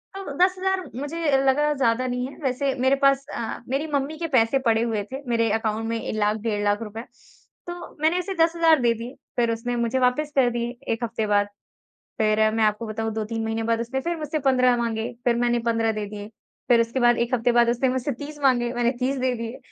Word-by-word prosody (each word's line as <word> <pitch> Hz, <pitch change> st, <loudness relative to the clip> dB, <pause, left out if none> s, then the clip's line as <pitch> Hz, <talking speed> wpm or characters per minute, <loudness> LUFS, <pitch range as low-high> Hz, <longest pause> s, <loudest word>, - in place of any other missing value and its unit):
तो 390 Hz, -7 st, -6 dB
10,000 370 Hz, +1 st, +2 dB, 0.2 s
मुझे 295 Hz, +4 st, -4 dB, 0.3 s
लगा 295 Hz, +3 st, +3 dB
ज़्यादा 255 Hz, -2 st, +1 dB
नहीं 250 Hz, +1 st, -2 dB
है 280 Hz, -, -12 dB
वैसे 270 Hz, +1 st, 0 dB
मेरे 260 Hz, +2 st, +3 dB
पास 275 Hz, 0 st, +4 dB
अ, 225 Hz, -, -4 dB
मेरी 275 Hz, +4 st, -1 dB
मम्मी 285 Hz, +2 st, -1 dB
के 335 Hz, 0 st, -3 dB
पैसे 260 Hz, -1 st, +3 dB
पड़े 225 Hz, -1 st, +3 dB
हुए 220 Hz, -3 st, -1 dB
थे 270 Hz, +2 st, -5 dB
मेरे 230 Hz, -1 st, +2 dB
अकाउंट 220 Hz, 0 st, -1 dB
में 230 Hz, 0 st, -1 dB
ए -, -, -4 dB
लाख, 210 Hz, 0 st, +1 dB
डेढ़ 210 Hz, -1 st, -2 dB
लाख 205 Hz, +2 st, +1 dB
रुपए, 220 Hz, +1 st, -7 dB, 0.7 s
तो 350 Hz, 0 st, -8 dB
मैंने 330 Hz, +3 st, +3 dB
उसे 385 Hz, +2 st, -3 dB
10,000 330 Hz, -2 st, +4 dB
दे 235 Hz, -1 st, +3 dB
दिए। 235 Hz, +3 st, -7 dB, 0.2 s
फिर 235 Hz, -1 st, +2 dB
उसने 240 Hz, +2 st, -3 dB
मुझे 245 Hz, +3 st, 0 dB
वापस 255 Hz, +4 st, +1 dB
कर 255 Hz, -3 st, +4 dB
दिए 240 Hz, +1 st, -3 dB, 0.2 s
1 230 Hz, +1 st, -5 dB
हफ़्ते 225 Hz, -2 st, -2 dB
बाद। 205 Hz, 0 st, +2 dB, 0.7 s
फिर 215 Hz, 0 st, +3 dB
मैं 225 Hz, -1 st, +2 dB
आपको 210 Hz, +2 st, 0 dB
बताऊँ 220 Hz, +1 st, -3 dB
2-3 225 Hz, +1 st, -3 dB
महीने 225 Hz, 0 st, -2 dB
बाद 230 Hz, 0 st, +2 dB
उसने 250 Hz, +3 st, -2 dB
फिर 340 Hz, +4 st, -2 dB
मुझसे 305 Hz, 0 st, -2 dB
15 255 Hz, -1 st, +4 dB
माँगे, 230 Hz, 0 st, -2 dB
फिर 240 Hz, -1 st, +3 dB
मैंने 240 Hz, 0 st, +1 dB
15 225 Hz, -1 st, +1 dB
दे 210 Hz, -1 st, -4 dB
दिए। 205 Hz, 0 st, -8 dB, 0.4 s
फिर 240 Hz, -2 st, +5 dB
उसके 230 Hz, +3 st, -1 dB
बाद 240 Hz, 0 st, +4 dB
1 235 Hz, +2 st, 0 dB
हफ़्ते 245 Hz, 0 st, +2 dB
बाद 235 Hz, 0 st, +4 dB
उसने 245 Hz, +2 st, +1 dB
मुझसे 260 Hz, +2 st, -1 dB
30 295 Hz, +4 st, -8 dB
माँगे, 240 Hz, -3 st, +3 dB
मैंने 240 Hz, 0 st, +2 dB
30 265 Hz, +2 st, 0 dB
दे 255 Hz, -1 st, 0 dB
दिए। 230 Hz, +2 st, -6 dB
240 Hz, 220 wpm, -24 LUFS, 225-275 Hz, 0.7 s, फिर